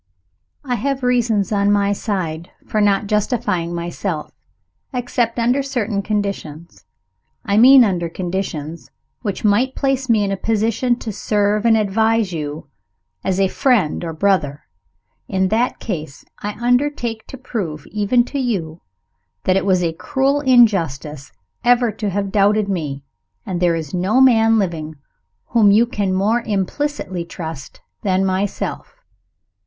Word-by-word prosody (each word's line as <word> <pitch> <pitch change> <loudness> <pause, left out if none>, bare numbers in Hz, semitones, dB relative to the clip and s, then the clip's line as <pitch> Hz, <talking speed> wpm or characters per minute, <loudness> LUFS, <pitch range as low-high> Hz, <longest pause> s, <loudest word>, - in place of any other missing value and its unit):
I 250 -3 -2
have 275 -1 -2
reasons, 235 -5 +1
on 200 -1 +2
my 200 0 +2
side, 175 -6 -3 0.2
for 215 - -1
not 205 0 +2
justifying 205 -5 -1
myself 170 -1 -4 0.6
except 245 -2 -1
under 245 +4 +2
certain 235 -7 -2
conditions. 170 - -4 0.6
I 200 +1 +1
mean 260 +3 +8
under 175 -6 0
conditions 170 -3 -5 0.3
which 205 -5 -4
might 235 +6 +2
place 270 -1 -1
me 220 -3 +4
in 200 - -1
a 195 - -1
position 225 +4 0
to 225 - -5
serve 210 +2 +1
and 225 -1 +5
advise 220 -1 +1
you 150 -1 -5 0.6
as 190 0 0
a 195 - +4
friend 210 - +1
or 165 - -3
brother. 160 -4 0 0.6
In 190 -1 0
that 235 +4 +1
case, 155 -9 -6
I 210 0 -4
undertake 240 -2 0
to 265 - -9
prove, 185 - -5
even 215 +4 +2
to 280 - -4
you, 180 -11 -2 0.6
that 185 - +2
it 195 - 0
was 185 -2 +3
a 165 -1 0
cruel 270 - 0
injustice 170 - +2 0.3
ever 245 -1 +3
to 210 0 -3
have 200 0 -2
doubted 205 +1 +3
me, 150 -8 -3 0.4
and 180 -2 -3
that - - -2
there 170 -1 +3
is 160 -4 -5
no 190 +7 +1
man 225 -4 +5
living 165 -6 -2 0.5
whom 220 -4 +4
you 215 +4 +5
can 205 -5 -2
more 205 +6 +1
implicitly 205 -2 -2
trust 160 -4 -8 0.2
than 190 -1 +1
myself. 190 +1 -3
205 Hz, 145 wpm, -19 LUFS, 175-235 Hz, 0.6 s, mean